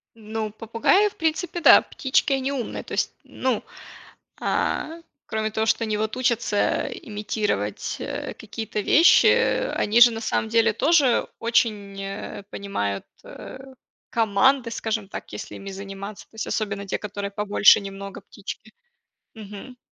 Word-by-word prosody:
Ну, 220 0 -4
попугаи, 230 - +2
в - - -17
принципе, 325 +2 -1
да. - - +9
Птички 265 +1 0
они 270 +1 -1
умные, 250 -4 -4
то - - -11
есть, - - -1
ну, 255 -4 -2 0.8
а, - - 0 0.4
кроме 220 0 -2
того, 220 +1 0
что 225 +1 +2
они 215 -1 -1
вот 215 +2 -2
учатся 235 -4 +1
имитировать, 205 - -3
э, - - -5
какие-то 220 -1 -5
вещи, 325 - +6
э, - - +3
они 220 +3 +2
же 240 0 +10
на 225 -1 -5
самом 220 0 -1
деле 230 -1 +4
тоже 285 -5 +3
очень, 210 -4 0
э, 195 +1 -6
понимают, 105 - -3 0.2
э, - - -10 0.5
команды, 230 +3 +2
скажем 220 -3 -3
так, - - -8
если - - -7
ими 195 - -8
заниматься, 195 +1 -8
то - - -27
есть 220 - -4
особенно 200 -2 -2
те, - - -2
которые 205 -1 -5
побольше 210 +1 +5
немного 195 0 -8
птички, 210 +2 -9 0.6
мгм. 215 +4 -10
220 Hz, 145 wpm, -24 LUFS, 200-235 Hz, 0.8 s, же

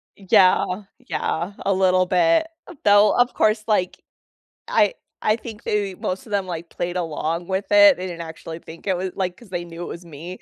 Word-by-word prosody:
Yeah, 185 0 +3 0.3
yeah, 175 +5 -2
a 195 - +3
little 185 -1 +3
bit, 180 - +3 0.4
though, 205 +1 +5
of 245 0 +3
course, 215 0 +2
like, 185 -5 0 0.7
I - - +3 0.3
I 215 - +3
think 225 -2 -10
they 200 -2 -1
most 185 +4 -4
of 210 - -13
them 200 -2 0
like, 170 -2 -6
played 175 +1 -4
along 165 0 -2
with 190 +1 -1
it, 300 -2 +7
they 185 - -5
didn't 175 -2 -6
actually 160 0 -8
think 165 0 -13
it 190 -2 +1
was 185 +1 -3
like, 185 -2 -2
'cause 235 0 -17
they 175 -1 -4
knew 170 0 -9
it - - -4
was 170 +1 -8
me. 170 +3 -9
185 Hz, 195 wpm, -22 LUFS, 170-205 Hz, 0.7 s, it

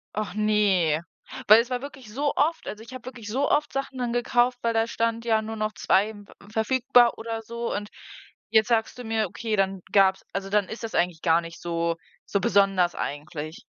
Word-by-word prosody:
Och 210 -4 -3
ne, 200 -7 +2 0.5
weil 215 +2 +9
es 240 - -7
war 250 0 -2
wirklich 265 -6 -10
so 285 +2 0
oft 320 +3 0
also, 215 +1 -6
ich 235 - -12
habe 255 -1 -9
wirklich 235 -5 -8
so 270 +6 0
oft 295 0 +1
Sachen 270 -1 -4
dann 245 -2 -1
gekauft, 245 +1 +2
weil 230 0 0
da 225 0 +2
stand, 230 0 -1
ja: 220 -1 +3
„Nur 220 +1 -5
noch 215 0 -2
2, 205 +3 +2
m 205 -2 -11
ve - - -17 0.2
verfügbar“, 245 +1 +3
oder 225 0 -4
so, 235 +1 -4
und 205 0 -4 0.6
jetzt 220 0 +4
sagst 230 0 +1
du 245 - -8
mir, 220 -2 0
okay, 215 +3 -3
dann 195 -1 0
gab's 190 -1 +4
also 195 0 -3
dann 205 -1 +2
ist 230 - -8
das 225 - -5
eigentlich 175 -2 0
gar 165 -1 +4
nicht 165 0 -10
so 170 -1 -1 0.3
so 200 - 0
besonders 195 -3 +3
eigentlich. 150 +2 -5
220 Hz, 210 wpm, -25 LUFS, 195-235 Hz, 0.6 s, weil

